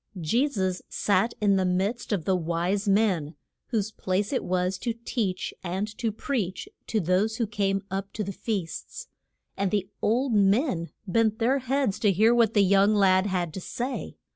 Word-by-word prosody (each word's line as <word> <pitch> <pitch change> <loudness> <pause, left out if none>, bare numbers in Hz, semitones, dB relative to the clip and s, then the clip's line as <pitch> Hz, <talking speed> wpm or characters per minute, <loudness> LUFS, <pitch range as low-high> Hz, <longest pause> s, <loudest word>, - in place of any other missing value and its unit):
Je 230 - +2
sus 190 -9 -2
sat 205 +3 +1
in 200 -2 +3
the 190 - +2
midst 190 +7 -1
of 185 -7 -1
the 190 - +2
wise 175 +4 -1
men, 190 -7 +2 0.3
whose 215 -3 -1
place 195 +4 -1
it 260 - 0
was 185 +1 -1
to 235 -2 -2
teach 195 -7 -2
and 190 +4 -3
to 225 -1 -1
preach 215 - -3 0.2
to 220 - 0
those 190 +5 +1
who 235 - +1
came 195 -2 -1
up 195 +1 -3
to 215 - -3
the 200 - -4
feasts, 190 -6 -4 0.5
and 200 -1 0
the 195 -1 0
old 240 +4 +1
men 200 - +2 0.2
bent 220 +2 +2
their 255 +5 +2
heads 260 -4 0
to 210 - +3
hear 215 +5 +4
what 230 -2 +3
the 205 - +6
young 200 +2 +4
lad 190 -1 +4
had 175 -4 -1
to 190 - -5
say. 250 +7 -4
200 Hz, 180 wpm, -26 LUFS, 185-225 Hz, 0.5 s, the